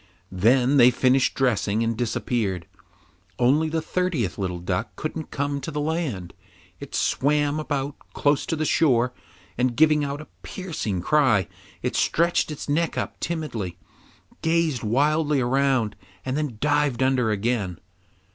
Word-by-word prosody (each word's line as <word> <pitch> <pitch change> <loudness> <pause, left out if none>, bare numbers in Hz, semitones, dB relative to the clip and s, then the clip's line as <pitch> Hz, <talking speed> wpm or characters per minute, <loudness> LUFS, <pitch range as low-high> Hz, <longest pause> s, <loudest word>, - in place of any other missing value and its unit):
Then 125 +8 +3
they 125 -1 +8
finished 130 +1 +2
dressing 115 -4 +1
and 115 0 0
disappeared. 110 -5 -1 0.7
Only 145 +6 +3
the 160 0 -1
thirtieth 170 - -1
little 90 -2 -2
duck 90 +4 -3
couldn't 155 0 -5
come 140 0 -2
to 135 - -5
the 150 -1 -3
land; 145 - -2 0.5
it - - -8
swam 145 +1 +1
about 145 -2 -2 0.2
close 145 -1 +1
to 160 - 0
the 155 0 -1
shore, 125 -6 +3 0.5
and, 125 -1 +1
giving 155 +2 +4
out 140 0 -3
a 155 - -8 0.2
piercing 150 - -4
cry, 125 - +3 0.4
it - - -1
stretched 170 0 +2
its 150 - -6
neck 160 +3 0
up - - -3
timidly, 120 - -4 0.6
gazed 160 -5 +1
wildly 145 +6 +2
around, 130 -3 +1 0.3
and 130 0 -2
then 145 -7 -2
dived 145 -2 +1
under 130 -3 +2
again. 105 -4 -1
135 Hz, 140 wpm, -24 LUFS, 115-150 Hz, 0.7 s, they